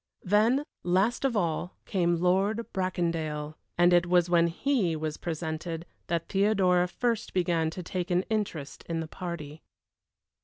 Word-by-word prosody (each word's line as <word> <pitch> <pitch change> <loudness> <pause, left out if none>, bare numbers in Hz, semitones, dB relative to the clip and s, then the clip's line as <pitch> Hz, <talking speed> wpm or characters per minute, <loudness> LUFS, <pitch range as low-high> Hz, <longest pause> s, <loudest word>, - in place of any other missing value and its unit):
Then, 220 +8 +3 0.2
last 195 +9 +1
of 245 -5 +1
all, 175 -1 -1
came 175 -3 +1
Lord 195 +5 +2
Bracondale 165 -5 -1 0.2
and 175 +1 +5
it 175 0 +4
was 175 -1 +3
when 170 -1 +5
he 185 - 0
was 155 -1 -3
presented 165 0 -4 0.2
that 170 -1 -1
Theodora 190 -3 +3
first 230 +2 -2
began 170 -3 +2
to 180 +3 -6
take 180 +1 -3
an 180 +1 +2
interest 190 -11 -3
in 165 -1 -1
the 160 - -3
party. 160 -3 -6
175 Hz, 145 wpm, -28 LUFS, 165-195 Hz, 0.2 s, and